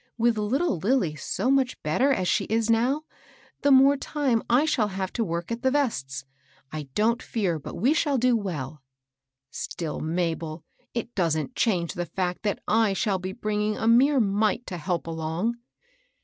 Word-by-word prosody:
With 235 0 +3
little 215 - 0
Lilly 195 - +1
so 250 - -1
much 265 -2 +1
better 245 - +2
as 185 -9 0
she - - +1
is 225 +1 +1
now, 240 +4 +3
and 315 - -29
the 285 - +3
more 275 +1 +7
time 270 -5 0
I 250 +6 +4
shall 240 -9 +1
have 190 -1 -4
to 235 - 0
work 170 0 -3
at 230 +1 -3
the 260 - +3
vests, 220 - -1 0.5
I 150 -3 -6
don't 230 +3 +2
fear 185 -8 -1
but - - -8
we 250 - +3
shall 290 -3 +1
do 250 0 +3
welL" 155 - -4 0.7
Still, 160 -1 -4
Mabel, 165 -1 -2 0.3
it 235 0 -3
doesn't 165 +4 0
change 180 -7 +1
the 175 -2 -4
&ct 180 -1 -1
that 205 -2 -2
I 220 -2 +3
shall 195 -1 0
be 185 +1 -4
bringing 210 -1 -1
a 225 - -1
mere 265 +5 +5
mite 215 +2 +1
to 180 - -5
help 175 +1 -2
along." 165 +8 -2
210 Hz, 175 wpm, -26 LUFS, 170-245 Hz, 0.7 s, more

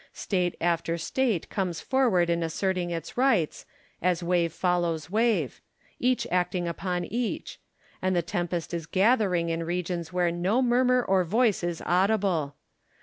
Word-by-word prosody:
State 180 -3 -1
after 170 -1 0
State 210 +3 -1
comes 185 -5 -2
forward 235 -10 +2
in 170 0 0
asserting 180 +2 -1
its 170 +5 -5
rights, 240 - +1 0.3
as 180 0 +1
wave 170 -1 +1
follows 175 -2 -1
wave; 215 - +1 0.4
each 250 0 +1
acting 180 0 0
upon 175 +1 -2
each; 235 +5 -3 0.4
and 185 0 +1
the 175 - +1
tempest 175 -1 -3
is 165 -2 -4
gathering 190 -4 +2
in 165 0 -1
regions 175 -1 -3
where 180 -1 +1
no 180 +7 +1
murmur 250 0 +3
or 190 -3 +2
voice 215 +2 +1
is 175 -1 -3
audible. 180 -6 +1
180 Hz, 145 wpm, -27 LUFS, 170-205 Hz, 0.4 s, murmur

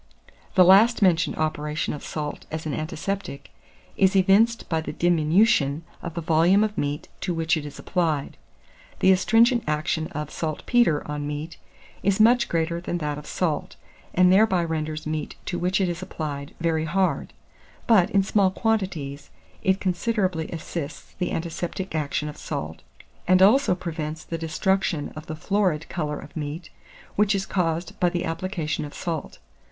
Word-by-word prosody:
The 185 -2 +7
last 210 +5 +6
mentioned 170 -3 +3
operation 150 -1 -2
of 150 - -7
salt 150 -1 -5
as 160 0 -5
an 155 - -2
antiseptic 155 +1 -4 0.4
is 190 0 +3
evinced 205 +5 +4
by 160 -1 0
the - - -5
diminution 165 -2 +3 0.2
of 170 -2 -6
the 170 - -2
volume 165 +6 +4
of 215 -1 -1
meat 145 -2 -2
to 180 -3 -2
which 165 0 +1
it 150 -2 -4
is 145 - -10
applied. 160 -6 -1 0.6
The 190 - +5
astringent 225 +6 +4
action 155 +1 -1
of 150 0 -6
saltpetre 160 +3 +1
on 150 -1 -3
meat 150 +3 -5 0.4
is 200 0 +1
much 235 +2 +5
greater 170 +1 -1
than 175 0 -3
that 150 -3 -3
of 150 - -12
salt, 165 -5 -2 0.4
and 180 0 +6
thereby 190 -3 +4
renders 155 -1 -3
meat 155 0 -3
to 175 - -3
which 180 +2 +1
it 190 - +2
is 175 0 -3
applied 145 -5 -5
very 160 -1 0
hard; 185 +4 0 0.5
but, 205 -5 +5
in 200 -3 +3
small 195 0 +3
quantities, 185 -10 -2 0.3
it 190 -1 +2
considerably 185 -3 -1
assists 160 -2 -6
the 180 - -1
antiseptic 175 +3 -4
action 150 -1 -1
of 150 0 -7
salt, 80 - -5 0.5
and 185 0 +5
also 210 +2 +5
prevents 160 -3 -5
the 165 - -5
destruction 165 0 0
of 155 +1 -9
the 155 - -4
florid 180 -2 0
colour 150 -4 -3
of - - -12
meat, 155 +2 -5 0.4
which 210 0 +3
is 195 0 -1
caused 170 -2 -2
by 180 - +3
the 175 0 -2
application 165 -2 -3
of 145 - -8
salt. 165 -4 -4
170 Hz, 160 wpm, -25 LUFS, 155-190 Hz, 0.6 s, The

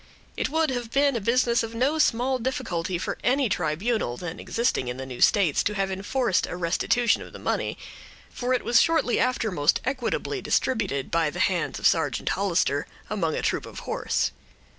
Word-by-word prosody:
It - - -1
would 320 -1 +1
have 245 -3 -3
been 280 +1 +2
a 230 - -1
business 235 +2 +2
of 225 0 -5
no 275 +7 +1
small 255 -1 +2
difficulty 225 -9 -2
for 175 - -4
any 265 -1 +2
tribunal 175 - -1
then 175 -1 -6
existing 235 - -1
in 125 +1 -4
the 130 - -5
new 125 -2 -8
states 185 -8 +4
to 210 - +1
have 195 -1 -1
enforced 200 +2 0
a - - -5
restitution 190 +7 +1
of - - -10
the - - -8
money; - - -2 0.5
for 245 0 -3
it - - -3
was 240 - +5
shortly 325 -7 +2
after 250 -4 +1
most 145 -3 +2
equitably 260 -2 -2
distributed, 200 - 0
by 165 -2 +2
the 155 - -8
hands 185 -2 0
of - - -6
Sergeant 155 -6 +2
Hollister, 175 -7 0 0.2
among 170 -7 0
a - - -3
troop - - -1
of - - -9
horse. - - -1
215 Hz, 185 wpm, -25 LUFS, 170-250 Hz, 0.5 s, was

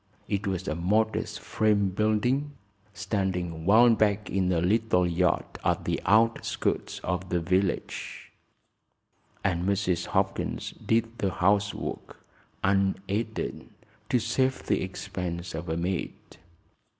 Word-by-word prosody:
It 100 0 -1
was 95 -1 -2
a - - 0
modest 105 +7 0
frame 105 -2 +2
building 110 +9 +1 0.4
standing 95 -6 -2
well 115 +4 +7
back 105 -1 +1
in 95 -1 +1
a 85 - +2
little 95 0 +2
yard 85 0 +1 0.2
at - - 0
the - - -1
outskirts 115 +3 +1
of 90 +1 -2
the 90 - +1
village, 95 +2 -2 1.1
and 90 -3 0
Mrs. 95 -2 0
Hopkins - - -1
did 115 +1 -1
the 100 - +1
housework, 100 +2 0 0.5
unaided, 100 +3 -1 0.4
to - - +3
save 130 +3 0
the - - +1
expense 85 0 -5
of 85 +1 -5
a 80 - -1
maid. 90 +1 -2
95 Hz, 115 wpm, -27 LUFS, 90-110 Hz, 1.1 s, well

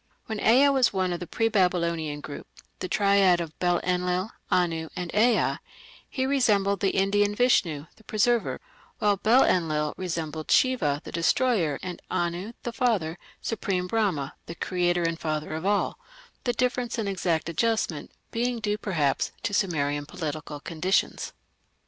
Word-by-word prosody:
When 220 -1 -4
Ea 255 +7 +5
was 265 -3 +3
one 185 -2 0
of 175 - -4
the 175 - -6
pre 225 - +1
Babylonian 170 -7 0
group 145 - -8 0.3
the - - -3
triad 200 -3 +4
of 165 -2 -6
Bel 175 -1 +2
Enlil, 180 +3 0 0.2
Anu, 165 -3 +1
and 180 -2 -4
Ea 230 +3 +3 0.5
he 260 -1 -1
resembled 210 -8 +2
the 195 - 0
Indian 205 +1 +2
Vishnu, 175 - +2
the 220 - -20
Preserver, 230 +2 +1 0.4
while 205 -1 +2
Bel 225 +7 +5
Enlil 155 -4 +1
resembled 165 -4 -4
Shiva, 160 - +3
the - - -8
Destroyer, 170 - +2
and 180 -1 -6
Anu, 175 +6 -2
the 240 - -4
father, 210 -10 0 0.2
supreme 195 -5 -1
Brahma, 180 -9 0
the 170 - -6
Creator 175 -1 0
and 165 0 -1
Father 155 -1 -3
of 160 +4 -3
All, 205 0 +1 0.5
the 245 - +1
difference 250 0 -1
in 220 -3 -1
exact 175 -5 0
adjustment 170 -2 -1 0.2
being 240 +1 -1
due, 210 -1 -1
perhaps, 155 -10 0
to 205 - -2
Sumerian 145 -7 0
political 155 -3 -5
conditions. 170 +6 -1
185 Hz, 150 wpm, -26 LUFS, 165-220 Hz, 0.5 s, Ea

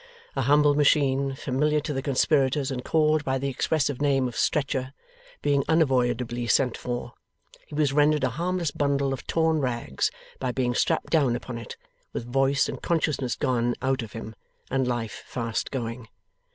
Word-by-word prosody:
A - - 0
humble 145 0 +4
machine, 140 -2 +2
familiar 150 +3 +1
to 150 0 -3
the 135 - -2
conspirators 140 0 +2
and 125 -1 -4
called 155 0 +2
by 135 -1 0
the 140 +1 -2
expressive 145 0 0
name 135 -3 +2
of 120 - -7
Stretcher, 135 -3 0 0.5
being 140 -1 +2
unavoidably 125 -6 +1
sent 125 +1 +2
for, 120 -1 -5 0.5
he - - -9
was 145 -2 +2
rendered 150 0 +3
a 130 - +2
harmless 170 +3 -1
bundle 140 -2 0
of 135 - -7
torn 160 -1 +2
rags 120 - -1 0.3
by 130 -1 -1
being 125 -1 0
strapped 160 +6 0
down 140 -7 +3
upon 120 -1 -5
it, 115 - -9 0.4
with 115 - -4
voice 135 +3 +2
and - - -6
consciousness 150 -6 0
gone 120 -1 0
out 130 0 +1
of 110 -2 -8
him, 115 -1 -7 0.4
and 130 -1 +1
life 120 -3 -3
fast 115 -2 -3
going. 115 -2 -4
135 Hz, 165 wpm, -26 LUFS, 125-145 Hz, 0.5 s, humble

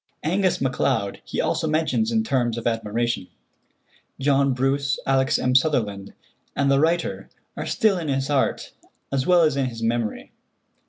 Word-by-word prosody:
Angus 185 +3 +1
MacLeod 115 -6 -1
he - - -5
also 160 - 0
mentions 140 -8 0
in 110 -1 +1
terms 120 -1 0
of 115 - -6
admiration. 115 -2 -1 0.9
John 140 0 +2
Bruce, 135 +2 0
Alex. 135 0 +2
M. 125 - 0
Sutherland, 110 -8 0 0.4
and 140 -1 +2
the 135 - +4
writer 165 +3 0 0.3
are - - -5
still 215 -6 +2
in 165 - -5
his 135 -1 -1
heart 140 -2 0 0.4
as 135 -1 -1
well 180 -2 +5
as 155 -3 +2
in 135 -2 0
his 115 -2 -7
memory. 115 -1 -2
135 Hz, 155 wpm, -23 LUFS, 115-145 Hz, 0.9 s, well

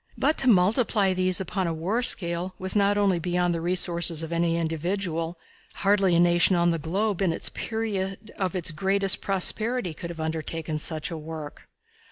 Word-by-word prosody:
But 310 - +2
to 265 - +3
multiply 205 0 +3
these 185 0 +1
upon 190 0 -2
a 165 - -1
war 190 +9 -1
scale 180 -5 0
was 185 +1 -3
not 205 0 +3
only 195 -4 +2
beyond 175 +1 0
the 165 - -3
resources 170 -2 +2
of 160 - -6
any 170 0 +1
individual 165 +1 -3 0.4
hardly 195 -3 +2
a - - +4
nation 175 +1 +4
on 170 0 +2
the 165 - -2
globe 195 +5 -2
in 190 - +2
the 165 - +1
period 215 -2 -4
of 190 -1 -3
its 170 -2 -1
greatest 195 +4 +1
prosperity 205 +1 +1
could 170 +2 -8
have 170 -1 -8
undertaken 160 0 -4
such 155 +1 -3
a 165 - -4
work. 155 -1 -9
180 Hz, 180 wpm, -25 LUFS, 165-195 Hz, 0.4 s, a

